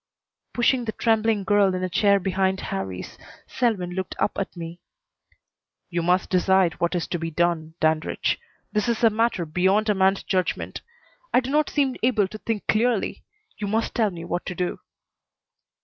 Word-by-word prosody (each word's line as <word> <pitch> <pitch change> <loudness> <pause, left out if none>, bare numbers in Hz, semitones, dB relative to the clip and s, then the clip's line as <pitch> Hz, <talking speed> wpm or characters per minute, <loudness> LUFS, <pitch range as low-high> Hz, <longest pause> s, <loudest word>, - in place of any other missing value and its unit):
Pushing 245 0 +2
the 220 - -1
trembling 225 -2 +1
girl 195 -1 +3
in 185 - -3
a - - +1
chair 200 +3 +3
behind 190 0 0
Harrie's, 95 -1 -5 0.3
Selwyn 220 -9 -1
looked 185 0 -4
up - - +1
at 195 -2 -4
me. 170 +1 -7 1.1
"You 170 0 0
must 180 +2 +1
decide 185 -2 +3
what 170 +2 0
is 175 - 0
to 175 - -2
be 165 0 -3
done, 165 -1 0
Dandridge. 155 0 +1 0.3
This 210 0 0
is 235 0 -1
a 225 - +6
matter 220 -5 +1
beyond 190 +7 +2
a - - +5
man's 190 0 +2
judgment. 185 -2 -1 0.5
I - - +5
do 260 +1 -4
not 300 +1 +2
seem 275 -3 0
able 225 -5 +2
to 215 - -8
think 220 -2 -3
clearly. 230 -1 +1 0.4
You 205 - -2
must 220 +3 0
tell 220 -3 +2
me 170 -3 -8
what 175 +1 -2
to 180 - -4
do." 180 0 -2
190 Hz, 175 wpm, -24 LUFS, 175-220 Hz, 1.1 s, a